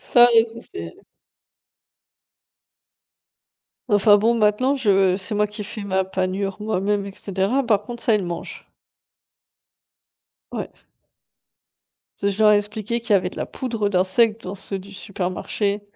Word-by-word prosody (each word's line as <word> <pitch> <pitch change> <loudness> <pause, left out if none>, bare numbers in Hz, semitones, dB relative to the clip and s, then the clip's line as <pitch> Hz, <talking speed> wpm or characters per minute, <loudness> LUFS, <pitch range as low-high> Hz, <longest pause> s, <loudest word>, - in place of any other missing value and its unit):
ça, 240 0 +6
il 225 0 +6
le 230 - -9
sait 85 - -9 2.9
Enfin, 205 0 +5
bon, 230 +3 +2
maintenant 230 +5 +2
je 195 -7 +3
c'est 200 +3 -4
moi 210 0 +2
qui 210 +1 -7
fais 210 +1 -7
ma 190 -1 0
panure 190 +1 -2
moi-même 205 -1 -1
et 195 - -9
cetera, 200 +7 -1
par 215 -4 +2
contre, 240 +2 -7
ça 235 - +3
il 210 - 0
le 180 - -5
mange. 170 -1 -7 1.8
Ouais. - - -4 1.5
Parce 200 0 0
que - - -10
je 220 - +2
leur 210 - +7
ai - - +5
expliqué 210 +2 -3
qu'il 235 -1 -6
y - - +7
avait 185 -2 +2
de - - -13
la - - -2
poudre 230 -5 -3
d'insectes 205 +4 +2
dans 185 - -5
ceux 195 0 -4
du 195 +2 -13
supermarché. 200 +1 -3
205 Hz, 155 wpm, -22 LUFS, 190-220 Hz, 2.9 s, leur